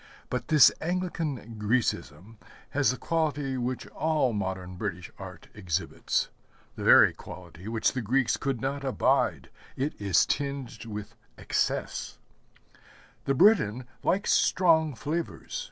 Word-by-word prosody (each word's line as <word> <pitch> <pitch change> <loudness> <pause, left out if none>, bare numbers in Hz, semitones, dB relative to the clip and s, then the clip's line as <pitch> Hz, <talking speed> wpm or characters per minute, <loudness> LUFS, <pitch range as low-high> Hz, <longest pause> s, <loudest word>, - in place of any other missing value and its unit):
But 125 -1 -2
this 150 -4 +7
Anglican 160 -10 -3
Grecism 105 -3 -1 0.3
has 145 0 +2
the 125 - -1
quality 150 -5 -1
which 125 0 -3
all 155 -6 0
modern 95 -2 -4
British 90 -3 -5
art - - -10
exhibits, 90 -4 -2 0.5
the - - -6
very - - +7
quality 90 +1 -11
which 110 0 +1
the 130 - -2
Greeks 125 +3 +1
could 135 -4 -2
not 140 +3 -3
abide, 135 -2 +1 0.2
it 140 +3 -1
is 100 -3 +4
tinged 140 -5 -3
with 105 0 -7 0.2
excess. - - -2 1.1
The 135 - +1
Briton 130 - +4 0.2
likes 200 +2 +1
strong 160 -5 +3
flavors. 165 - -4
130 Hz, 120 wpm, -28 LUFS, 105-150 Hz, 1.1 s, this